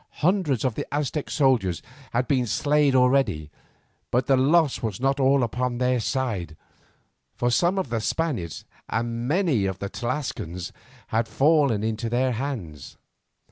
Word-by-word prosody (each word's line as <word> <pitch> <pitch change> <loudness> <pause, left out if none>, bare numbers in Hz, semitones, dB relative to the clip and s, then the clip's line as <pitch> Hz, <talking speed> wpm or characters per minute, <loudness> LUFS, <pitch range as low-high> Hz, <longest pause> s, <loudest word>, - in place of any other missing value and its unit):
Hundreds 170 - +2
of 130 - +1
the - - -5
Aztec 145 0 -2
soldiers 120 - +1 0.3
had 120 +1 0
been 130 -3 +1
slain 145 +5 +2
already, 125 - +2 0.6
but 125 +1 +1
the 135 - +4
loss 145 +3 +3
was 110 -5 -3
not 135 +2 +1
all 135 0 +4
upon 125 +1 -1
their 125 0 +1
side, 110 - -2 0.8
for 120 0 0
some 175 +9 +2
of 190 -9 -1
the 115 -1 -1
Spaniards 120 - -2 0.2
and 115 +1 -2
many 150 - +2
of 95 -1 -3
the 100 0 -5
Tlascalans 120 - -4 0.4
had 110 +1 0
fallen 140 -7 +3
into 110 +1 -2
their 125 +2 +1
hands. 110 - -5
125 Hz, 145 wpm, -25 LUFS, 110-140 Hz, 0.8 s, the